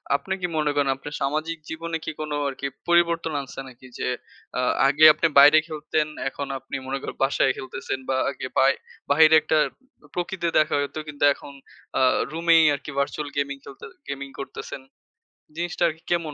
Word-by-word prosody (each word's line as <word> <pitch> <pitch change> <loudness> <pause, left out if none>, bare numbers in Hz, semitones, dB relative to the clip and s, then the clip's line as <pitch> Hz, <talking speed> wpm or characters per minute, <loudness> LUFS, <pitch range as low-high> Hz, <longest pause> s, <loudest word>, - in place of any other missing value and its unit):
আপনি 190 +7 -2
কি 180 - 0
মনে 150 -1 +1
করেন 145 -1 +2
আপনার 140 +2 -9
সামাজিক 155 +4 -1
জীবনে 165 +1 -4
কি - - -2
কোন 155 -1 -4 0.2
আরকি 140 +1 -4 0.2
পরিবর্তন 170 -1 +3
আনছে 135 - -10
নাকি? 130 0 -14
যে - - -2 0.5
আ - - +2 0.3
আগে 145 +3 +5
আপনি 160 +2 +1
বাইরে 145 +2 +9
খেলতেন, 155 -1 -1 0.2
এখন 140 +1 -6
আপনি 135 +1 -8
মনে 135 +1 -2
করেন - - -6
বাসায় 135 -1 +2
খেলতেছেন 130 0 -5
বা 135 - +1
আগে 140 - -5
বাই 135 +1 +5 0.4
বাইরে 155 +2 +6
একটা 155 - +1 0.6
প্রকৃতি 175 0 -2
দেখা 155 -1 +2
যেত। 140 - -7
কিন্তু 145 -1 -5
এখন 140 - -12 0.5
আ - - +2 0.3
রুমেই 165 0 +4
আরকি 145 +1 -8
ভার্চুয়াল 145 +1 -2
গেমিং 140 0 -1
খেলতে 140 - -13 0.2
গেমিং 140 0 -5
করতেছেন। 135 0 -7 0.7
জিনিসটা 175 +1 -2
আরকি 160 0 -5
কেমন 170 -3 0
150 Hz, 170 wpm, -24 LUFS, 140-160 Hz, 0.7 s, বাইরে